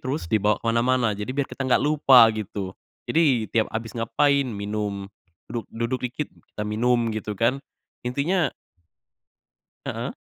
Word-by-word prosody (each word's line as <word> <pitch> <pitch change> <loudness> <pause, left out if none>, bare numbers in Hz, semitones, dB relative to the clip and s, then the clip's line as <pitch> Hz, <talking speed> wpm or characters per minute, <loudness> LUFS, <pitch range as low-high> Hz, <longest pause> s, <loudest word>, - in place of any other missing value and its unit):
terus 135 +4 -3
dibawa 105 +1 +2
ke - - -25
mana-mana 120 0 +2
jadi 105 +2 -5
biar 140 - +2
kita 135 - -4
nggak 125 - +4
lupa 135 -6 +7
gitu. 100 -3 -5 0.3
Jadi 140 -9 +3
tiap 110 -2 +2
abis 115 0 -3
ngapain 140 +4 +2
minum, 100 -2 -3 0.5
duduk 115 -1 -4
duduk 115 +3 -2
dikit 145 +4 -4 0.3
kita 105 - -2
minum 115 +2 +1
gitu 105 -1 -4
kan 120 +6 +1 0.4
intinya 145 +7 +1 1.4
Heeh. - - -3
115 Hz, 140 wpm, -24 LUFS, 110-135 Hz, 1.4 s, lupa